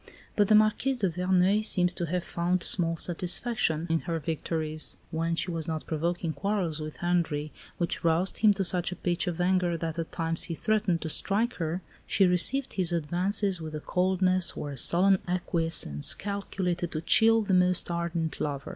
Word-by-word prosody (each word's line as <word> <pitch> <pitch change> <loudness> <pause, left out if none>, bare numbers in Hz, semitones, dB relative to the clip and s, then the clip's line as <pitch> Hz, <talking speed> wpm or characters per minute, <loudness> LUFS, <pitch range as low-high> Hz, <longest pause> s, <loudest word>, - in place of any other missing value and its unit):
But 205 -1 +3
the 215 - +5
Marquise 215 +5 +2
de 195 -6 0
Verneuil 180 +4 +1
seems 180 -4 +1
to 175 -1 -4
have 180 +2 -2
found 175 0 -1
small 165 -2 +2
satisfaction 175 -1 0
in 165 -1 0
her 170 -1 -3
victories. 155 -1 -2
When 165 +1 -1
she 175 - -2
was 165 -2 -4
not 160 -1 -4
provoking 170 +1 -2
quarrels 190 -6 -2
with 155 0 -7
Henri, 165 -4 -1 0.3
which 170 - -2
roused 170 +3 +1
him 215 - +5
to 195 -1 -1
such 175 -1 -1
a - - -5
pitch 175 +1 -1
of 175 -1 -3
anger 180 -1 +1
that 165 0 -4
at 165 - -5
times 165 0 -2
he 165 - -4
threatened 210 -3 0
to 160 - -4
strike 215 +9 +1
her, 170 +2 -3 0.2
she 195 - +3
received 185 +10 +3
his 180 -3 +1
advances 180 +4 +1
with 155 -1 -6
a - - -4
coldness 185 +1 +1
or 145 - -5
a - - -7
sullen 185 +8 +3
acquiescence 165 - +1
calculated 185 -4 -3
to 155 - -3
chill 225 +5 +5
the 195 - -1
most 180 -1 +2
ardent 170 -1 -3
lover. 140 -2 -4
175 Hz, 180 wpm, -27 LUFS, 165-190 Hz, 0.3 s, the